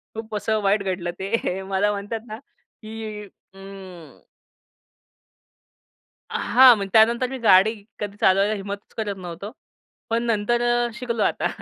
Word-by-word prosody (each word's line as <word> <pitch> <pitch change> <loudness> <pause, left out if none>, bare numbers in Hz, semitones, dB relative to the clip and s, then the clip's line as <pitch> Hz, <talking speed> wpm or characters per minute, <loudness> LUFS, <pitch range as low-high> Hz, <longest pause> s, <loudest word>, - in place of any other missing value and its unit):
खूप 220 -1 -6
असं 215 +1 0
वाईट 200 0 +1
घडलं 180 -2 -3
ते. 195 -1 -2
मला 195 +2 0
म्हणतात 205 +3 -4
ना, 215 +1 -7 0.4
की 215 -1 -7 0.3
अं 195 -4 -12 2.0
हां. 255 -1 +6
मग 200 -1 -4
त्यानंतर 235 +3 +4
मी 265 - -5
गाडी 215 -1 +5 0.3
कधी 205 -1 -5
चालवायला 195 +2 +3
हिम्मतच 200 0 -7
करत 210 -3 -2
नव्हतो. 180 +3 -8 0.6
पण 230 +1 0
नंतर 230 +1 0
अ, 240 0 +1
शिकलो 235 -3 -2
आता. - - 0
210 Hz, 130 wpm, -23 LUFS, 195-230 Hz, 2.0 s, हां